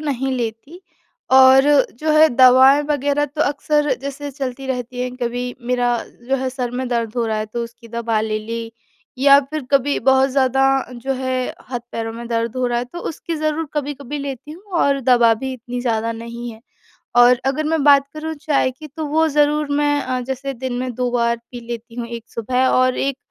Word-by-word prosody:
नहीं 270 -3 -2
लेती 240 +9 -5 0.5
और 265 0 +8 0.4
जो 310 0 0
है 315 +1 +7
दवाएँ 260 +3 +6
वग़ैरह 290 0 +1
तो 295 +2 -7
अक्सर 295 0 +1
जैसे 280 +1 -6
चलती 270 -1 -5
रहती 250 -1 -4
हैं। 250 0 -4
कभी 245 0 -3
मेरा 245 -1 +1 0.3
जो 270 - +2
है 260 0 -2
सर 250 -2 -3
में 255 +1 -3
दर्द 235 -2 -2
हो 235 - +1
रहा 220 -1 -1
है 215 - -3
तो 235 +2 -4
उसकी 230 0 -14
दवा 230 -1 -1
ले 215 0 -1
ली 230 +1 -6 0.5
या 275 +1 +7
फिर 310 -2 -3
कभी 280 +1 +2
बहुत 265 0 +4
ज़्यादा 270 0 +2 0.3
जो 250 +3 -3
है 260 0 -1 0.3
हाथ-पैरों 235 -2 -5
में 235 +1 -8
दर्द 230 +1 -2
हो 255 -1 0
रहा 240 0 0
है 245 - -2
तो 295 +8 -10
उसकी 330 +1 -6
ज़रूर 310 0 -2
कभी-कभी 290 -1 -4
लेती 280 0 -6
हूँ 355 +5 -13 0.2
और 280 -1 +2
दवा 240 -3 +4
भी 265 +4 -5
इतनी 245 0 -6
ज़्यादा 230 -2 -1
नहीं 235 +1 -7
है। 220 0 -13 0.6
और 245 +1 +7
अगर 280 +3 0
मैं 315 -1 0
बात 280 -1 +6
करूँ 315 +1 -5
चाय 275 -4 +1
की 305 +4 -11
तो 305 +2 -6
वो 320 +2 +2
ज़रूर 295 0 +2
मैं 290 0 +2
अ, 255 -1 -2
जैसे 265 +2 -4
दिन 255 +1 -5
में 255 -1 -3
2 250 +1 -1
बार 235 -1 +1
पी 245 -1 -8
लेती 235 -1 -7
हूँ 240 -1 -4
एक 235 -1 -7
सुबह 250 +3 0
और 255 0 +2
एक 275 -1 -1
255 Hz, 200 wpm, -20 LUFS, 240-280 Hz, 0.6 s, और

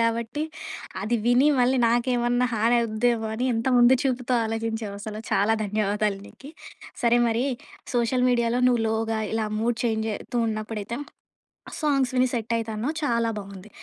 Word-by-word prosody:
గాబట్టి 230 +5 0 0.6
అది 225 +4 0
విని, 245 +4 +5
మళ్ళీ 250 +2 +3
నాకేమన్నా 240 +1 +2
హానవుద్దేమోని 225 0 +1
ఎంత 225 +2 -2
ముందు 240 +1 +7
చూపుతో 255 -2 0
ఆలోచించావసల. 220 -2 -4
చాలా 210 +3 +3
ధన్యవాదాలు 205 0 0
నీకి. 275 - -13 0.5
సరే 240 0 +4
మరి, 230 +2 0 0.5
సోషల్ 245 +1 +2
మీడియాలో 240 0 +1
నువ్వు 245 -2 +3
లోగా 225 0 -1
ఇలా 220 -1 0
మూడ్ 235 +1 0
చేంజయితూ 220 +1 -2
ఉన్నప్పుడైతే 215 +2 -4 0.8
సాంగ్స్ 275 -4 +1
విని 255 0 +4
సెట్టయితా 230 -1 -1
అన్నావు 240 +9 -2
చాలా 235 -4 +1
బావుంది. 200 0 -9
230 Hz, 125 wpm, -25 LUFS, 220-245 Hz, 0.8 s, ముందు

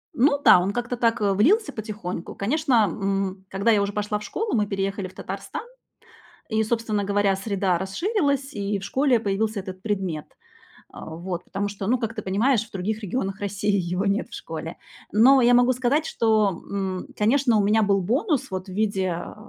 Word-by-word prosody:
Ну 280 +3 +3
да, - - +8
он 195 +3 -1
как-то 245 0 -2
так, 230 -2 +1
э, 200 -1 +2
влился 365 - +3
потихоньку. 210 -5 -6
Конечно, 255 +1 +2
м, 195 +1 -2
когда 200 +4 +1
я 205 -2 +4
уже 200 0 -2
пошла 210 0 -2
в - - -9
школу, 440 0 -3
мы 210 -2 +1
переехали 195 0 -2
в 185 - -15
Татарстан, - - -6 0.9
и, 220 -1 +1
собственно 220 -2 -1
говоря, 200 -1 +2
среда 195 -3 0
расширилась, 280 - -1
и 200 -1 -2
в - - -15
школе 260 0 +2
появился 210 +1 -1
этот 185 -1 -8
предмет, 190 -8 -2 0.7
э, - - -10
вот. 170 +2 -5
Потому 200 +1 -3
что, 200 -1 -6
ну 250 +1 +3
как 225 -2 -3
ты 215 - -5
понимаешь, 220 +5 +2
в 225 - -19
других 210 +4 -3
регионах 195 -1 -3
России 205 +1 -1
его 180 +3 -2
нет 200 +3 0
в - - -10
школе. 165 +1 -6 0.4
Но 260 +6 +6
я 245 +1 +5
могу 245 +1 +5
сказать, 255 +5 +1
что, 220 -3 +2 0.2
м, 190 -2 -3
конечно, 235 +2 +3
у 205 - +3
меня 215 +2 +3
был 200 -1 +2
бонус 270 - 0
вот 185 +1 -4
в - - -8
виде, 200 -1 0
э, 175 -1 -5
205 Hz, 190 wpm, -24 LUFS, 195-235 Hz, 0.9 s, да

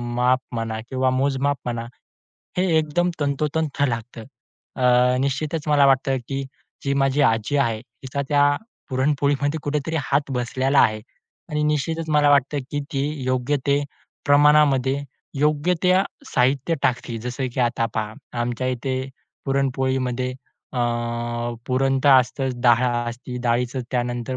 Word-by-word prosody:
माप 125 +1 +3 0.2
म्हणा 115 -1 -3
किंवा 130 0 +1
मोजमाप 135 +2 +1
म्हणा, 120 -1 -3 0.7
हे 185 - +3
एकदम 160 +3 +1
तंतोतंत 145 +1 -1
लागतं." 115 -1 -5 0.5
अ, 125 0 +4
निश्चितच 145 +3 -2
मला 145 -2 +5
वाटतं, 135 0 +3
की 135 0 -3 0.4
जी 140 - 0
माझी 135 +1 +2
आजी 115 +6 0
आहे, 115 -5 +1
तिचा 130 +4 -6
त्या 145 0 +4 0.3
पुरणपोळीमध्ये 145 +2 +1
कुठेतरी 150 +2 -2
हात 140 +1 0
बसलेला 130 +2 +1
आहे 110 0 +3 0.5
आणि 150 0 0
निश्चितच 160 +2 -1
मला 150 -1 +4
वाटतं, 145 +1 +3
की 145 - -2
ती 135 - 0 0.2
योग्य 130 +2 0
ते 140 0 +3 0.4
प्रमाणामध्ये, 145 -2 +4 0.4
योग्य 150 +4 +2
त्या 185 +1 +4 0.3
साहित्य 135 +5 +2
टाकते. 120 -2 0
जसं 125 +3 -3
की - - -1
आता 120 -1 +1
पहा, 110 -1 -2 0.3
आमच्या 120 +1 -2
इथे 130 +1 -2 0.4
पुरणपोळीमध्ये, 130 -2 0 0.4
अ, 125 - -3 0.9
पुरण 135 +1 +1
तर 145 - +7
असतच, 130 +1 -3
डाळ 120 0 +5 0.2
असती 125 +1 -7
डाळीचं 125 +1 0
त्यानंतर 120 0 -2
135 Hz, 130 wpm, -23 LUFS, 125-145 Hz, 0.9 s, तर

